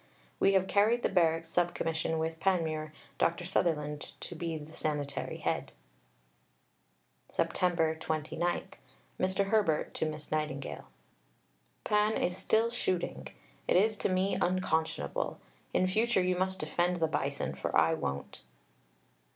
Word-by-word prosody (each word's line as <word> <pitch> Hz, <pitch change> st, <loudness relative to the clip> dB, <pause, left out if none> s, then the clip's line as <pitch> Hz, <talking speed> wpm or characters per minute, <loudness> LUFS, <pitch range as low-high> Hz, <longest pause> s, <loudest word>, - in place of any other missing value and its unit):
We 195 Hz, -, +4 dB
have 190 Hz, -1 st, +4 dB
carried 215 Hz, +5 st, +3 dB
the -, -, +3 dB
Barracks 165 Hz, -3 st, +2 dB
Sub 175 Hz, +1 st, +1 dB
Commission 160 Hz, 0 st, -1 dB
with 160 Hz, 0 st, -2 dB
Panmure, 160 Hz, -4 st, 0 dB, 0.3 s
Dr. 170 Hz, +1 st, +1 dB
Sutherland 150 Hz, -5 st, -1 dB
to -, -, -6 dB
be 165 Hz, -1 st, -3 dB
the 155 Hz, +1 st, -10 dB
Sanitary 145 Hz, -3 st, -2 dB
Head. -, -, -2 dB, 1.6 s
Sept. 165 Hz, -3 st, +1 dB
29 160 Hz, +2 st, -1 dB, 0.6 s
(Mr. 190 Hz, +1 st, +1 dB
Herbert 195 Hz, -9 st, +2 dB
to 160 Hz, -, -1 dB
Miss 155 Hz, -1 st, -6 dB
Nightingale). 150 Hz, -3 st, -3 dB, 1.0 s
Pan 210 Hz, +1 st, +2 dB
is 180 Hz, -, 0 dB
still 220 Hz, +5 st, +2 dB
shooting. 175 Hz, -, -2 dB, 0.4 s
It -, -, +3 dB
is 215 Hz, +4 st, +4 dB
to -, -, 0 dB
me 185 Hz, +1 st, +1 dB
unconscionable. 160 Hz, -, 0 dB, 0.3 s
In 185 Hz, -, +3 dB
future 215 Hz, +1 st, +2 dB
you 180 Hz, 0 st, +2 dB
must 190 Hz, +1 st, -1 dB
defend 175 Hz, -1 st, +1 dB
the 165 Hz, -2 st, +1 dB
Bison, 160 Hz, -, -1 dB
for -, -, -1 dB
I -, -, +5 dB
won't. 70 Hz, +1 st, -4 dB
175 Hz, 130 wpm, -31 LUFS, 155-190 Hz, 1.6 s, I